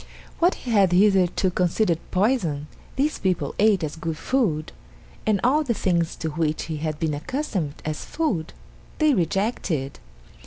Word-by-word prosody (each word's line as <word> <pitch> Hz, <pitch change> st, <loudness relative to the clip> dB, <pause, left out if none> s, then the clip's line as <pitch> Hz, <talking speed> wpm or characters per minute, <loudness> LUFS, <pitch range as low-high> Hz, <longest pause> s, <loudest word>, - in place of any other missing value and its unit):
What 350 Hz, +2 st, +4 dB
he 245 Hz, -, -6 dB
had 195 Hz, -5 st, +4 dB
hitherto 190 Hz, -1 st, +3 dB
considered 180 Hz, -1 st, +1 dB
poison 185 Hz, -, +1 dB, 0.3 s
these 295 Hz, +3 st, 0 dB
people 180 Hz, -7 st, 0 dB
ate 205 Hz, -4 st, +4 dB
as 150 Hz, -, -3 dB
good 165 Hz, -1 st, -4 dB
food, 180 Hz, -, 0 dB, 0.6 s
and 210 Hz, -2 st, +3 dB
all 285 Hz, +6 st, +3 dB
the 240 Hz, -5 st, -1 dB
things 170 Hz, -4 st, 0 dB
to 160 Hz, -, -3 dB
which 155 Hz, 0 st, -1 dB
he 160 Hz, -2 st, -4 dB
had 155 Hz, 0 st, -3 dB
been 160 Hz, -2 st, 0 dB
accustomed 175 Hz, -, -3 dB
as 155 Hz, -1 st, -3 dB
food 210 Hz, -, -2 dB, 0.5 s
they 310 Hz, -2 st, +4 dB
rejected. 175 Hz, -, -1 dB
180 Hz, 150 wpm, -24 LUFS, 160-220 Hz, 0.6 s, What